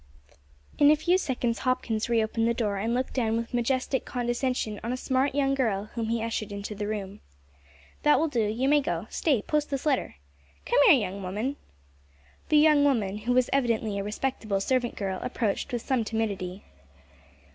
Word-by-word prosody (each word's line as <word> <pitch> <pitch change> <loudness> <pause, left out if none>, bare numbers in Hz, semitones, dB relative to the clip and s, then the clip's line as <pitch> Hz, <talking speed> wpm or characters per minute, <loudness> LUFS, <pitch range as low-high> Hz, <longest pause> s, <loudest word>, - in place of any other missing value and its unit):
In 290 - +7
a 305 - +7
few 345 +4 +2
seconds 245 -7 -1
Hopkins 245 -4 -1
reopened 225 0 +1
the 235 - +1
door, 210 -4 -1
and 220 +4 -1
looked 255 +1 -2
down 225 -3 0
with 230 +2 -5
majestic 255 +2 0
condescension 240 -3 -2
on 235 - -2
a 255 - -2
smart 260 +1 0
young 275 -1 +2
girl 215 -6 -1
whom 230 -2 -2
he 230 0 -1
ushered 225 -2 -3
into 200 +1 -5
the 205 0 -4
room. 205 -1 -5 0.8
"That 295 - +5
will 325 - +2
do; 250 -7 0
you 235 +5 -1
may 295 +1 +4
go 275 - -3
stay, 270 -10 +1
post 300 -1 0
this 275 0 -3
letter. 280 - 0 0.5
Come - - +2
here, 285 - +8
young 200 -2 -4
woman." 210 +9 -3 0.9
The 305 - +5
young 300 -1 +5
woman, 215 -8 +1
who 240 +4 -1
was 255 0 +2
evidently 230 -6 0
a - - -2
respectable 215 -1 -2
servant 245 +3 0
girl, 190 -2 -3
approached 245 0 -2
with 240 -2 -3
some 260 -4 0
timidity. 205 -4 -3
235 Hz, 180 wpm, -27 LUFS, 215-265 Hz, 0.9 s, here